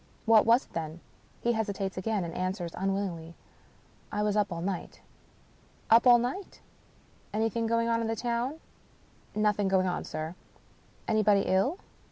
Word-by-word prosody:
"What 225 Hz, -1 st, +5 dB
was 235 Hz, +3 st, +5 dB
it, -, -, -27 dB
then?" 160 Hz, 0 st, -4 dB, 0.4 s
He 235 Hz, -, +2 dB
hesitates 200 Hz, -3 st, -2 dB
again, 200 Hz, +1 st, -1 dB
and 170 Hz, -1 st, -5 dB
answers 185 Hz, -1 st, -3 dB
unwillingly, 190 Hz, -4 st, -3 dB, 0.4 s
" -, -, -32 dB
I 210 Hz, -, -1 dB
was 210 Hz, -1 st, +1 dB
up 205 Hz, -2 st, +1 dB
all 170 Hz, -, -3 dB
night." 185 Hz, -2 st, -4 dB, 0.5 s
" -, -, -32 dB
Up 230 Hz, +3 st, +7 dB
all 240 Hz, -1 st, +9 dB
night? 250 Hz, +12 st, -4 dB, 0.8 s
Anything 225 Hz, +1 st, 0 dB
going 230 Hz, 0 st, +1 dB
on 230 Hz, 0 st, +1 dB
in 225 Hz, -, -1 dB
the 225 Hz, -, -1 dB
town? 240 Hz, +6 st, -2 dB, 0.3 s
" -, -, -32 dB
" -, -, -32 dB
Nothing 210 Hz, -1 st, +2 dB
going 190 Hz, -1 st, +3 dB
on, 180 Hz, -, -1 dB
sir." 155 Hz, +2 st, -5 dB, 0.7 s
"Anybody 210 Hz, -2 st, +4 dB
ill?" 195 Hz, -, +1 dB
210 Hz, 170 wpm, -29 LUFS, 185-230 Hz, 0.8 s, all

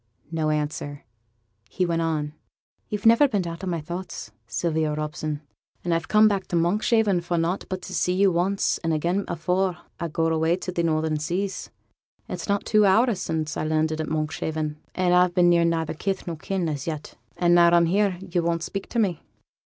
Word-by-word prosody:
No 160 Hz, -2 st, 0 dB
answer. 150 Hz, -1 st, -3 dB, 0.6 s
He 185 Hz, -, 0 dB
went 165 Hz, -1 st, 0 dB
on: 155 Hz, -2 st, -1 dB, 0.6 s
'Yo've 210 Hz, 0 st, -4 dB
never 230 Hz, +6 st, +7 dB
been 205 Hz, -8 st, -1 dB
out 170 Hz, +2 st, -6 dB
o' -, -, -3 dB
my 170 Hz, -2 st, -1 dB
thoughts, 170 Hz, -7 st, -6 dB, 0.2 s
Sylvia 155 Hz, +3 st, 0 dB
Robson; 150 Hz, 0 st, -3 dB, 0.4 s
and 175 Hz, -, 0 dB
I'm 165 Hz, -, +1 dB
come 215 Hz, +6 st, +5 dB
back 200 Hz, -3 st, -1 dB
to -, -, -2 dB
Monkshaven 200 Hz, +2 st, +2 dB
for 175 Hz, 0 st, -2 dB
nought 170 Hz, +3 st, -1 dB
but 185 Hz, -1 st, -4 dB
to 185 Hz, -, -7 dB
see 180 Hz, 0 st, +1 dB
you 195 Hz, +1 st, +4 dB
once 185 Hz, +3 st, +1 dB
and 165 Hz, -1 st, -1 dB
again 175 Hz, +6 st, 0 dB
afore 180 Hz, +2 st, 0 dB, 0.2 s
I 170 Hz, -, -2 dB
go 165 Hz, +1 st, -1 dB
away 160 Hz, +1 st, +2 dB
to 185 Hz, 0 st, -5 dB
the 175 Hz, -, -1 dB
northern 155 Hz, -1 st, 0 dB
seas. 185 Hz, +6 st, -3 dB, 0.6 s
It's -, -, -6 dB
not 200 Hz, 0 st, +1 dB
two 215 Hz, -1 st, +4 dB
hour 230 Hz, +5 st, +4 dB
sin' 160 Hz, -4 st, -2 dB
I -, -, -2 dB
landed 155 Hz, 0 st, 0 dB
at 155 Hz, -, -4 dB
Monkshaven, 155 Hz, 0 st, -2 dB, 0.2 s
and 180 Hz, -1 st, +2 dB
I've 180 Hz, -1 st, +4 dB
been 175 Hz, -1 st, +5 dB
near 170 Hz, -1 st, +4 dB
neither 165 Hz, -2 st, 0 dB
kith 190 Hz, +5 st, -3 dB
nor 170 Hz, -, -4 dB
kin 180 Hz, +2 st, -2 dB
as 145 Hz, -2 st, -4 dB
yet; 155 Hz, -2 st, -5 dB, 0.2 s
and 175 Hz, -1 st, +3 dB
now 170 Hz, 0 st, +7 dB
I'm 170 Hz, 0 st, +5 dB
here 195 Hz, +1 st, +1 dB
you 180 Hz, -2 st, -1 dB
won't 170 Hz, 0 st, -1 dB
speak 195 Hz, +2 st, -5 dB
to -, -, -4 dB
me.' 195 Hz, -7 st, +1 dB
170 Hz, 195 wpm, -25 LUFS, 160-190 Hz, 0.6 s, never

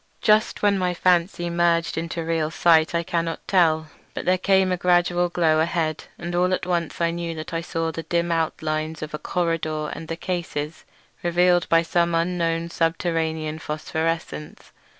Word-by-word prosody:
Just 215 Hz, 0 st, +3 dB
when 200 Hz, -1 st, +3 dB
my 180 Hz, -1 st, 0 dB
fancy 175 Hz, 0 st, +2 dB
merged 170 Hz, -1 st, +2 dB
into 165 Hz, 0 st, -3 dB
real 165 Hz, -2 st, 0 dB
sight 165 Hz, 0 st, +3 dB
I 170 Hz, -, +1 dB
cannot 165 Hz, 0 st, -3 dB
tell; 160 Hz, -4 st, +3 dB, 0.3 s
but -, -, -4 dB
there 185 Hz, 0 st, +3 dB
came 190 Hz, 0 st, +3 dB
a -, -, +2 dB
gradual 175 Hz, 0 st, +2 dB
glow 160 Hz, -3 st, +2 dB
ahead, 160 Hz, -1 st, -1 dB
and 175 Hz, 0 st, -5 dB
all 180 Hz, +1 st, +2 dB
at -, -, -6 dB
once 175 Hz, -2 st, -2 dB
I 170 Hz, -1 st, +2 dB
knew 170 Hz, -1 st, -4 dB
that 155 Hz, +1 st, -7 dB
I 165 Hz, -, -1 dB
saw 165 Hz, -1 st, -2 dB
the 165 Hz, -, -5 dB
dim 170 Hz, +2 st, -1 dB
outlines 155 Hz, -1 st, -2 dB
of 155 Hz, -, -6 dB
the 150 Hz, -, -5 dB
corridor 160 Hz, -3 st, -1 dB
and 165 Hz, -, -8 dB
the 165 Hz, -, -4 dB
cases, 170 Hz, -4 st, -4 dB, 0.4 s
revealed 175 Hz, 0 st, +2 dB
by 165 Hz, 0 st, +4 dB
some 170 Hz, 0 st, +1 dB
unknown 170 Hz, -1 st, 0 dB
subterranean 160 Hz, -2 st, -1 dB
phosphorescence. 160 Hz, 0 st, -4 dB
170 Hz, 170 wpm, -23 LUFS, 160-175 Hz, 0.4 s, by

